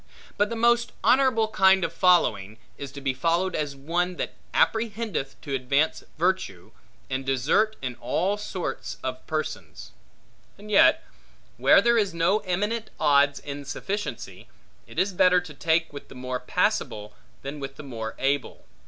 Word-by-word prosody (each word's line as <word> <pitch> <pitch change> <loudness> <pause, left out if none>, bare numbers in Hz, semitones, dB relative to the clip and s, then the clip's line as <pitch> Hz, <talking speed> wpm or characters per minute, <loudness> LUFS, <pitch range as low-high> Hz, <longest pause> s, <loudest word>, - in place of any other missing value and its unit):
But 205 0 +1
the 230 - -3
most 235 +1 +2
honorable 255 -4 +4
kind 190 -2 +4
of - - -2
following, 110 - +2 0.2
is 140 -2 -7
to 140 - -8
be 135 -1 0
followed 170 +7 0
as 145 -2 -2
one, 175 +6 -1
that - - -4 0.2
apprehendeth 220 - -1
to 140 - -6
advance 140 +4 0
virtue, 175 - -1 0.4
and 130 +1 -3
desert, 135 - +1
in 130 -1 -2
all 190 +5 0
sorts 205 -3 -5
of 130 0 -4
persons. 155 -1 -5 0.7
And 210 +1 -11
yet, 200 - +5 0.5
where - - +5
there 235 0 +4
is 200 -5 -1
no 170 +6 +2
eminent 205 +4 -2
odds 140 0 +4
in 145 0 -7
sufficiency, 195 - -5 0.4
it - - -14
is 195 +1 +1
better 180 0 +5
to 170 -4 -11
take 160 +2 0
with 145 - -9
the - - -13
more 125 0 -4
passable, 125 - -1 0.3
than 140 +2 -6
with 135 -1 -6
the 150 - -10
more 115 -5 -6
able. 140 0 -2
165 Hz, 155 wpm, -25 LUFS, 135-205 Hz, 0.7 s, yet